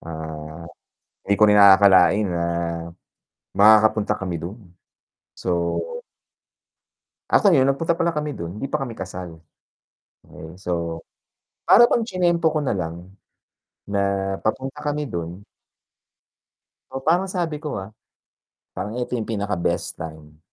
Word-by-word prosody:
ah, 80 0 -8 0.6
'di 100 - +2
ko 105 - +3
rin 105 - +5
aakakalain 100 0 +6
na 85 -1 -1 1.1
makakapunta 110 0 +4
kami 90 -4 -4
dun, 95 +1 -9 0.6
so - - -8 1.8
Ako 195 -6 +5
yun 130 - +5
nagpunta 160 +5 +1
pala 170 0 0
kami 150 -2 -3
dun, 85 +5 -7
hindi 135 - -3
pa 150 0 -2
kami 120 -4 -7
kasal. 90 -3 -7 0.9
Okey, 80 +3 -12
so 85 -3 -4 0.6
para 240 0 +7
bang 230 - +1
chinempo 175 -5 +1
ko 155 - 0
nalang 85 - -3 0.8
na 100 -1 0
papunta 130 +4 -2
kami 145 -1 -2
dun. 85 +3 -5 1.5
Oo, 135 - -4
parang 180 +3 +2
sabi 170 -4 -2
ko, 150 - -3
ah, 95 - -8 0.8
parang 100 +4 -5
ito 125 0 -4
yung 110 - -4
pinaka 105 -3 -2
best 85 0 -2
time, 75 -1 -9
100 Hz, 125 wpm, -22 LUFS, 85-140 Hz, 1.8 s, para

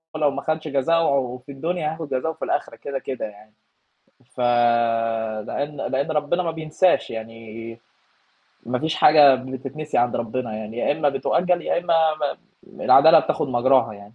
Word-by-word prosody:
لو 150 -2 +1
ما 140 - -5
خَدتش 155 +1 -3
جزائه 140 -3 0
في 140 - -10
الدنيا 160 +2 -3
هياخُد 160 -2 -7
جزائه 145 +5 -1
في 160 - -6
الآخرة - - -2
كده، 140 -1 -5
كده 130 -3 -5
يعني، 105 0 -14 0.7
ف - - -13 1.1
لإن 145 +1 -4
لإن 140 +3 -2
ربنا 150 +4 0
ما 165 - -2
بينساش، 160 +3 0
يعني 115 0 -9 0.9
ما 125 +1 -1
فيش 155 +2 -2
حاجة 145 -3 +7
بتتنسي 130 +4 -5
عند 120 0 +1
ربنا 115 0 -4
يعني، 110 +1 -7
يا - - +1
إمّا 150 -1 0
بتؤجّل 175 +5 0
يا - - 0
إمّا 175 -1 0 0.3
ما 145 - 0 0.4
م - - -14
العدالة - - +7
بتاخُد - - -2
مجراها 130 -2 +2
يعني، 100 +1 -15
140 Hz, 160 wpm, -22 LUFS, 120-155 Hz, 1.1 s, حاجة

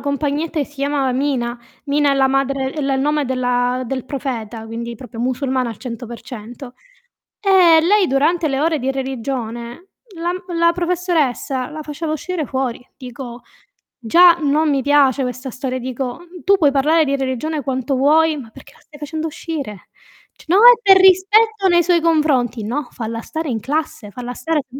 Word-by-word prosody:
compagnetta 290 +4 -2
che 285 - +1
si 295 - -21
chiamava 275 -1 -1
Mina. 250 -3 -1 0.3
Mina 290 0 +2
è 275 - +2
la 270 -1 +3
madre 270 0 0
è - - -8
il 275 -1 0
nome 295 +1 +1
della 250 -1 0
del 260 0 -4
profeta, 235 -5 -5
quindi 235 +1 -6
proprio 235 0 -9
musulmana 255 0 -1
al 220 - -9
100%. 240 +1 -9 0.7
Ehm, 360 -5 +5
lei 405 0 +4
durante 315 +5 +1
le 270 -2 -1
ore 315 0 +1
di 265 +2 -1
religione, 260 - -5 0.3
la 340 +1 -2
m 365 - -5 0.2
la 335 0 +4
professoressa 335 -8 -1
la 310 0 -7
faceva 305 +2 -5
uscire 330 0 -3
fuori. 260 -2 -3
Dico 245 -2 -9 0.6
già 345 +10 +7
non 300 +2 +2
mi 275 -2 +1
piace 280 -1 +3
questa 255 +1 -5
storia, 255 0 -4
dico, 255 +2 -4
mhmm: 350 0 -14
"Tu 395 +1 +4
puoi 295 -6 +3
parlare 305 +4 +3
di 280 0 0
religione 270 +4 -2
quanto 260 0 -2
vuoi, 310 +4 +3
ma 250 -6 -9
perché - - -16
la - - -23
stai 300 - -17
facendo 310 +2 -4
uscire?" 285 - -7 0.5
C - - -19
"No, 355 +4 +3
è 475 +4 +9
per 390 -2 +7
rispetto 390 +3 +4
nei 345 -1 +4
suoi 345 0 +2
confronti". 280 -9 +1
No, 255 +5 -3
falla 230 -1 -5
stare 320 +5 -5
in 230 -3 -2
classe, 275 -4 -3
falla 245 +2 -6
stare 305 +5 -1
qui. 260 +2 -10
275 Hz, 175 wpm, -19 LUFS, 250-320 Hz, 0.7 s, è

